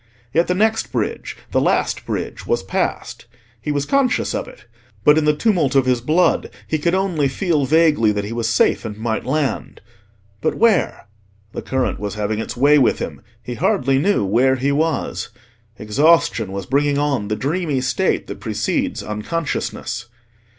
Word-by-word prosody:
Yet 170 Hz, +2 st, +3 dB
the 180 Hz, -, +1 dB
next 220 Hz, +3 st, +1 dB
bridge—the -, -, -3 dB
last -, -, 0 dB
bridge—was 470 Hz, -, -2 dB
passed. -, -, -3 dB, 0.3 s
He 150 Hz, -, -2 dB
was 145 Hz, -1 st, -1 dB
conscious 275 Hz, -, +1 dB
of -, -, -3 dB
it; -, -, -14 dB, 0.4 s
but 150 Hz, -, +6 dB
in 155 Hz, -1 st, +2 dB
the 150 Hz, 0 st, +3 dB
tumult 165 Hz, -, +1 dB
of 135 Hz, -1 st, +4 dB
his 125 Hz, -2 st, +1 dB
blood, 160 Hz, +8 st, +2 dB, 0.2 s
he 155 Hz, -, -1 dB
could 170 Hz, +4 st, +1 dB
only 180 Hz, -7 st, +1 dB
feel 150 Hz, 0 st, 0 dB
vaguely 150 Hz, -8 st, +4 dB
that 105 Hz, -1 st, -2 dB
he 105 Hz, +3 st, -5 dB
was 115 Hz, -1 st, -1 dB
safe -, -, +2 dB
and 105 Hz, -3 st, -6 dB
might 110 Hz, 0 st, -2 dB
land. 145 Hz, 0 st, -2 dB, 0.6 s
But -, -, 0 dB
where? 220 Hz, -6 st, +2 dB, 0.5 s
The -, -, -4 dB
current 130 Hz, -1 st, -1 dB
was 105 Hz, -1 st, -4 dB
having 105 Hz, 0 st, -2 dB
its 115 Hz, -, -5 dB
way 145 Hz, +3 st, +5 dB
with 130 Hz, -, +3 dB
him: -, -, -6 dB, 0.2 s
he 125 Hz, -, -5 dB
hardly 135 Hz, +3 st, +1 dB
knew 175 Hz, -, +2 dB
where 125 Hz, +7 st, +3 dB
he 135 Hz, +2 st, 0 dB
was: 155 Hz, -4 st, -1 dB, 0.5 s
exhaustion 120 Hz, -, +2 dB
was 100 Hz, -1 st, -5 dB
bringing 145 Hz, +1 st, +1 dB
on 140 Hz, -8 st, 0 dB
the 105 Hz, -, -1 dB
dreamy 150 Hz, +2 st, -1 dB
state 130 Hz, -, 0 dB
that -, -, -8 dB
precedes -, -, -2 dB
unconsciousness. 120 Hz, 0 st, -3 dB
140 Hz, 165 wpm, -20 LUFS, 120-160 Hz, 0.6 s, but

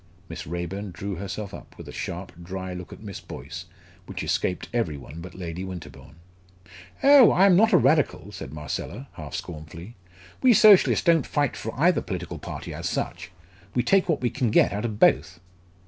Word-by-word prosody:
Miss 85 Hz, +2 st, -7 dB
Raeburn 85 Hz, +4 st, -4 dB
drew 95 Hz, +1 st, -5 dB
herself 100 Hz, +2 st, -5 dB
up, -, -, -11 dB
with -, -, -10 dB
a -, -, -7 dB
sharp 90 Hz, +2 st, -5 dB
dry 95 Hz, +1 st, -5 dB
look 90 Hz, 0 st, -8 dB
at -, -, -11 dB
Miss 100 Hz, -3 st, -7 dB
Boyce, -, -, -8 dB, 0.4 s
which -, -, -5 dB
escaped 90 Hz, -, -1 dB
every 95 Hz, -12 st, -1 dB
one 75 Hz, +4 st, -10 dB
but 90 Hz, +1 st, -10 dB
Lady 90 Hz, 0 st, -5 dB
Winterbourne. 75 Hz, -7 st, -9 dB, 0.9 s
"Oh! 275 Hz, -3 st, +8 dB
I 190 Hz, -, +5 dB
am 190 Hz, -3 st, +6 dB
not 220 Hz, +4 st, +5 dB
a 180 Hz, -, +7 dB
Radical!" 130 Hz, -, +2 dB
said 95 Hz, -9 st, -8 dB
Marcella, 80 Hz, -, -6 dB
half 75 Hz, -4 st, -8 dB
scornfully. 85 Hz, +6 st, -8 dB, 0.5 s
"We 255 Hz, -2 st, +6 dB
Socialists 205 Hz, -4 st, +6 dB
don't 165 Hz, -2 st, +4 dB
fight 145 Hz, -3 st, 0 dB
for 115 Hz, +3 st, -6 dB
either 175 Hz, +4 st, +4 dB
political 90 Hz, -5 st, -5 dB
party -, -, -7 dB
as -, -, -3 dB
such. -, -, -4 dB, 0.5 s
We 125 Hz, -, +2 dB
take 195 Hz, -2 st, +3 dB
what 160 Hz, -, +1 dB
we 120 Hz, -, 0 dB
can 125 Hz, -4 st, 0 dB
get 105 Hz, -, +4 dB
out 105 Hz, +3 st, -2 dB
of 110 Hz, -3 st, -3 dB
both." 85 Hz, +6 st, +3 dB
95 Hz, 185 wpm, -25 LUFS, 85-135 Hz, 0.9 s, Oh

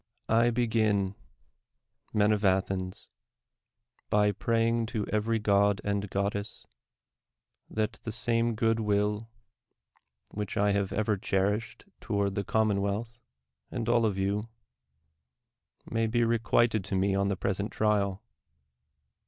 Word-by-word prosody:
I 115 Hz, +2 st, +4 dB
BEGIN, 110 Hz, -5 st, +1 dB, 1.0 s
men 105 Hz, 0 st, +3 dB
of 105 Hz, -1 st, 0 dB
Athens, 95 Hz, -1 st, 0 dB, 1.0 s
bj' 105 Hz, -1 st, +2 dB
praying 115 Hz, -1 st, +1 dB
to 110 Hz, -3 st, -2 dB
every 110 Hz, +1 st, +1 dB
^od 100 Hz, -1 st, +3 dB
and 100 Hz, -1 st, -1 dB
goddess, 100 Hz, +1 st, -3 dB, 1.0 s
that 110 Hz, -1 st, -1 dB
the 110 Hz, -, -4 dB
same 115 Hz, 0 st, +2 dB
good 115 Hz, +1 st, +1 dB
will, 105 Hz, +1 st, 0 dB, 1.0 s
which 105 Hz, -1 st, -4 dB
I 105 Hz, 0 st, +3 dB
have 100 Hz, -1 st, 0 dB
ever 110 Hz, -1 st, 0 dB
cherished 100 Hz, +5 st, -1 dB
toward 100 Hz, -3 st, -1 dB
the 100 Hz, -, -2 dB
commonwealth 110 Hz, +2 st, 0 dB, 0.5 s
and 115 Hz, -1 st, -4 dB
all 120 Hz, 0 st, +3 dB
of 100 Hz, -3 st, -2 dB
you, 100 Hz, +3 st, -1 dB, 1.4 s
may 115 Hz, 0 st, 0 dB
be 120 Hz, +2 st, +1 dB
requited 115 Hz, -1 st, +2 dB
to 95 Hz, -, -3 dB
me 95 Hz, +1 st, +2 dB
on 100 Hz, 0 st, +1 dB
the 100 Hz, -1 st, -1 dB
pres 95 Hz, +1 st, -1 dB
ent 100 Hz, +2 st, -3 dB
trial. 100 Hz, -3 st, 0 dB
105 Hz, 120 wpm, -29 LUFS, 100-115 Hz, 1.4 s, I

